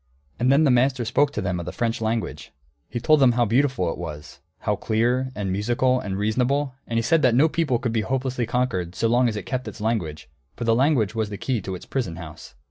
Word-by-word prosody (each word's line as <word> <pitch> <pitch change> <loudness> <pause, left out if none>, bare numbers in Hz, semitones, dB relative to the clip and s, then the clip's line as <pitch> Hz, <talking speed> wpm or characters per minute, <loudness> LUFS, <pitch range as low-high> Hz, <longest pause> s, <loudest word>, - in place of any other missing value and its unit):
'" 70 -1 -38
And 125 +2 +3
then 140 +3 +5
the 145 - +4
master 125 0 +2
spoke 140 +5 +2
to - - -2
them 90 -1 -1
of 85 - -6
the - - -3
French 115 -1 -2
language. 110 0 -3 0.4
He 120 - -3
told 155 +5 +4
them 130 -3 +5
how 120 0 +2
beautiful 115 -6 +1
it - - -7
was, 75 -3 -8 0.2
how - - 0
clear 120 +4 0
and 100 -3 -2
musical 120 +6 +1
and 95 -4 -4
reasonable, 125 +6 0
and 115 - -2
he 115 - +1
said 165 +5 +3
that 125 -4 +4
no 145 +6 +5
people 155 -6 0
could 115 -1 -3
be 115 - +1
hopelessly 130 -1 -2
conquered 110 -8 -1
so 115 - +1
long 120 +1 +3
as 110 - -4
it 105 - -5
kept 130 0 -3
its - - -8
language, 105 - -2 0.3
for - - -5
the 115 0 +3
language 125 -4 +2
was 110 -2 -1
the 100 - -6
key 120 +1 -1
to 95 0 -5
its 90 - -10
prison 115 -11 -3
house. 80 -5 -10
120 Hz, 245 wpm, -24 LUFS, 105-130 Hz, 0.4 s, then